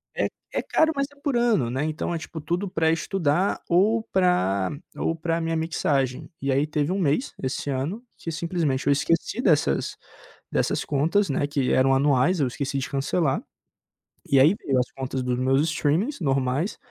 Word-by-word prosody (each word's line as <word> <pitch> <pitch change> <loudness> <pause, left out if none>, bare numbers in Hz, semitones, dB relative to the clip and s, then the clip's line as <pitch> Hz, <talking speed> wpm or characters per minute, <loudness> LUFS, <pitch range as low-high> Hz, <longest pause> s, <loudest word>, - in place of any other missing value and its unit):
É - - +1 0.3
é - - 0
caro, 320 0 +2
mas 275 - +1
é 285 - -19
por 285 -4 -1
ano, 225 - +2
né? 130 +4 -1
Então 155 +2 -2
é 170 - -1
tipo 160 0 -7
tudo 175 +6 -2
pra 160 -2 +1
estudar 170 +1 0
ou 210 +6 +3
pra 100 - +2 0.3
ou 165 - -1
pra 165 +1 -1
minha 165 0 -1
mixagem. 140 -5 -1
E 135 0 0
aí 140 +3 +2
teve 150 +1 -1
1 190 - 0
mês 165 - 0
esse 130 +2 -2
ano 145 - -2
que 165 - -5
simplesmente 160 -5 -1
eu 140 - +6
esqueci 165 - 0
dessas 150 - +1 0.5
dessas - - 0
contas, 165 +8 +1
né, 140 +1 +1
que 145 -3 -1
eram 135 +1 +4
anuais, 145 +5 +3
eu 140 - +3
esqueci 135 +2 -3
de 130 - -4
cancelar. 140 +1 0 0.9
E 135 - +5
aí 150 +7 +6
veio 140 - -1
as 125 0 0
contas 130 -1 -4
dos 125 -1 -1
meus 135 +2 +3
streamings 170 - 0
normais 135 +4 0
150 Hz, 180 wpm, -25 LUFS, 135-175 Hz, 0.9 s, eu